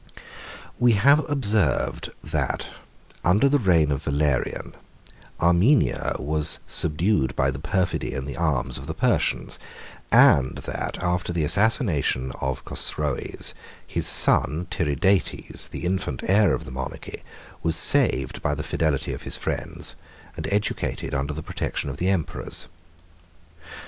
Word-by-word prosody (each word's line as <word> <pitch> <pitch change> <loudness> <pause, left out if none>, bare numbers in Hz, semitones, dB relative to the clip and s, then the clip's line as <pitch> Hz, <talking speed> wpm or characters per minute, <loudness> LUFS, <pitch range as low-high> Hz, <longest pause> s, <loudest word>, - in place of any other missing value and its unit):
We 120 -1 +5
have 140 +9 +4
observed, 110 -8 0 1.1
under 100 +10 +4
the 145 +1 +3
reign 85 - +3
of 70 0 -1
Valerian, 70 -2 -1
that - - -22 0.6
Armenia 90 - +3
was 75 +1 +1
subdued 80 -1 +1
by 65 +1 +2
the 70 - -6
perfidy 90 -2 -1
and 65 0 -3
the 70 - -5
arms 70 -6 -1
of 65 - -9
the 80 - -4
Persians, 120 +4 0 0.5
and 65 -2 +5
that, - - -4
after 90 0 -1
the 85 -2 0
assassination 80 - +1
of 65 0 -3
Chosroes, - - -2 0.3
his - - 0
son 80 +4 +3
Tiridates, 80 +4 0
the - - -6
infant 90 -8 -2
heir 100 -1 +4
of - - -7
the - - -9
monarchy, 65 +1 -6 0.4
was 80 0 +1
saved 65 -5 +2
by 75 - 0
the 75 - -4
fidelity 80 -4 -1
of - - -7
his - - -4
friends, - - -3 0.4
and - - -5
educated 100 -7 -1
under 70 +2 -2
the 80 - -6
protection 70 - -3
of 70 - -8
the 90 +4 0
emperors. 90 -5 -2
80 Hz, 135 wpm, -24 LUFS, 70-95 Hz, 1.1 s, We